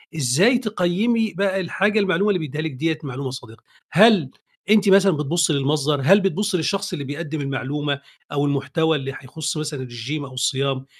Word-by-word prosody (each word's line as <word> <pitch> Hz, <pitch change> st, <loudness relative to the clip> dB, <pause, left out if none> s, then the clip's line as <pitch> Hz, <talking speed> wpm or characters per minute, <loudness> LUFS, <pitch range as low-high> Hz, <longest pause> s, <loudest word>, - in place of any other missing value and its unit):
إزاي 160 Hz, -, +3 dB
تقيّمي 215 Hz, +1 st, 0 dB
بقى 195 Hz, +1 st, 0 dB
الحاجة 200 Hz, +4 st, +1 dB
المعلومة 200 Hz, +1 st, +1 dB
اللي 185 Hz, -3 st, +1 dB
بيدّيها 155 Hz, -1 st, -4 dB
لِك 160 Hz, 0 st, -3 dB
ديّة 160 Hz, +4 st, -1 dB
معلومة 135 Hz, -1 st, -5 dB
صادقة؟ 120 Hz, -3 st, -11 dB, 0.3 s
هل 190 Hz, -, +5 dB, 0.4 s
أنتِ 210 Hz, -1 st, +4 dB
مثلًا 195 Hz, 0 st, +6 dB
بتبُصّي 160 Hz, +1 st, 0 dB
للمصدر؟ 145 Hz, +1 st, 0 dB
هل 195 Hz, +7 st, +6 dB
بتُبصّي 195 Hz, +1 st, 0 dB
للشخص 195 Hz, +3 st, -2 dB
اللي 145 Hz, -, -4 dB
بيقدّم 150 Hz, +2 st, -5 dB
المعلومة 140 Hz, +1 st, -3 dB, 0.3 s
أو 145 Hz, 0 st, 0 dB
المحتوى 145 Hz, +3 st, 0 dB
اللي 135 Hz, -1 st, -5 dB
هيخص 155 Hz, +4 st, -5 dB
مثلًا 150 Hz, -2 st, -4 dB
الرجيم 130 Hz, +4 st, -5 dB
أو 135 Hz, -, -11 dB
الصيام؟ 135 Hz, +1 st, -1 dB
155 Hz, 165 wpm, -22 LUFS, 140-195 Hz, 0.4 s, مثلًا